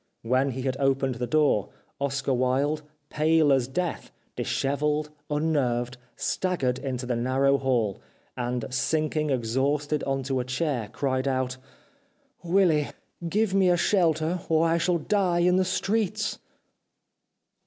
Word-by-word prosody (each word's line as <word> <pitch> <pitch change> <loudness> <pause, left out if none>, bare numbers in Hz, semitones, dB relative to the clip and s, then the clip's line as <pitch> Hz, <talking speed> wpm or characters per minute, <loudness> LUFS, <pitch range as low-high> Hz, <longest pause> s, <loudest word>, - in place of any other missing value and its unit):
When 130 +4 +2
he 130 0 -4
had 130 0 -1
opened 135 -1 +1
the 125 - 0
door, 150 -10 +2 0.3
Oscar 140 -1 -1
Wilde, 135 +4 +1 0.3
pale 155 -1 +3
as 130 -3 +2
death, 175 +6 -3 0.3
dishevelled, 150 +2 -1 0.2
unnerved, 130 -5 0 0.2
staggered 135 -9 -1
into 130 -2 -4
the 125 -1 -1
narrow 135 +3 +2
hall, 120 -7 0 0.3
and 120 -1 -2
sinking 155 +4 0
exhausted 140 +4 0
on 135 0 -1
to 135 0 -1
a - - 0
chair 130 -3 -2
cried 130 -1 -1
out: 130 -1 -1 0.5
" 275 -3 -40
Willy, 170 -4 +3 0.4
give 210 +1 +1
me 190 -2 +4
a 175 - +4
shelter 170 -2 +2
or 160 0 +3
I 165 +1 +2
shall 175 +1 +2
die 180 0 +1
in 180 +1 +4
the 185 - +3
streets." 215 +2 -1
140 Hz, 135 wpm, -26 LUFS, 130-165 Hz, 0.5 s, me